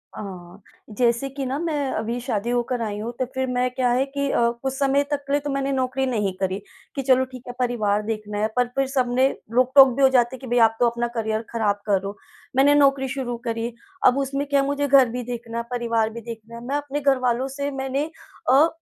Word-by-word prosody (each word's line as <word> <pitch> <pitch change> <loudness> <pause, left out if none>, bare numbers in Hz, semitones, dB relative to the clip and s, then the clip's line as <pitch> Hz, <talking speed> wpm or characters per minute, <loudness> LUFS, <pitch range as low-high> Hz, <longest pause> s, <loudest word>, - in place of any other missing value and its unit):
हाँ, 185 -1 -9 0.4
जैसे 235 +2 +2
कि 275 0 -5
ना, 265 +2 -2
मैं 300 -5 -1
अभी 230 +3 -2
शादी 235 -3 -2
होकर 245 0 0
आई 210 -2 -3
हूँ, 225 +3 -4
तो 255 - +1
फिर 260 0 0
मैं 250 0 0
क्या 250 -1 0
है 255 +2 +2
कि 280 0 -2
अ, 235 0 +3
कुछ 265 -1 -1
समय 275 +1 +2
तक 285 -1 -1
के 280 - -1
लिए 290 - +4
तो 290 - -4
मैंने 275 0 -1
नौकरी 260 0 0
नहीं 210 -7 -1
करी 190 0 -1 0.4
कि, 275 - -1
"चलो, 260 0 +3
ठीक 255 -1 -11
है, 245 - -5
परिवार 215 -4 +1
देखना 215 -1 -4
है।" 215 - +2
पर 245 -1 +2
फिर 270 -1 +1
सबने 255 -1 +2 0.3
रोक-टोक 260 +2 +7
भी 275 - -1
हो 265 - +7
जाते 245 +1 +3
है - - -13
कि, 260 - -9
"भई, 245 +1 +1
आप 225 -1 +5
तो 240 - +4
अपना 235 0 -2
करियर 220 -1 -1
खराब 210 -3 0
कर 205 -2 +3
रहे - - -9
हो।" 200 - -6 0.4
मैंने 280 +2 +5
नौकरी 275 -2 +4
शुरू 245 -3 -3
करी, 230 0 -1 0.4
अब 255 +2 +4
उसमें 275 +1 -1
क्या 280 0 +2
है, 275 - +2
मुझे 285 0 0
घर 265 -3 +6
भी 245 +1 -4
देखना 235 -1 -5
है, 235 - -1
परिवार 230 -2 0
भी 235 - -7
देखना 230 0 -9
है, 235 - -8
मैं 275 - -2
अपने 290 0 -4
घर 275 -1 +3
वालों 245 +2 +1
से 280 0 -1
मैंने 275 +4 -1 0.4
अ, 285 +5 +6
250 Hz, 240 wpm, -23 LUFS, 230-275 Hz, 0.4 s, रोक-टोक